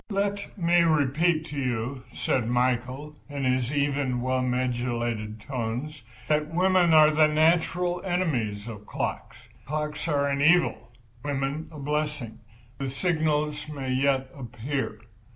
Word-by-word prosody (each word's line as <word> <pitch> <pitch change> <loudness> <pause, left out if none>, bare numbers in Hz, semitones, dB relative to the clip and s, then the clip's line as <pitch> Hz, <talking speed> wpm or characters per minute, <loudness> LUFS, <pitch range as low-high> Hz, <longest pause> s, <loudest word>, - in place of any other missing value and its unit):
"Let 200 +1 -2
me 175 -1 +4
repeat 155 +1 +2
to 145 - -4
you," 125 0 -2
said - - 0
Prince 115 -1 -2
Michael, 125 +4 0
in 140 -1 -4
his 130 -1 +1
even, 140 -3 0
well 130 +1 0
modulated 120 -3 -1
tones, 130 +4 -4 0.3
"that 150 0 +1
women 180 0 +3
are 155 -1 +7
the 155 0 +5
natural 170 +3 +2
enemies 125 - -1
of 105 -3 -8
clocks. - - -4 0.3
Clocks 150 +2 -3
are 140 -3 +1
an 140 0 0
evil, 175 +4 +3 0.3
women 140 +2 -2
a 155 - -10
blessing. 150 -5 -3 0.4
The 135 -1 -2
signal 155 0 0 0.2
may 135 -2 -3
yet 135 0 +1
appear." 125 -2 -4
140 Hz, 135 wpm, -26 LUFS, 125-155 Hz, 0.4 s, are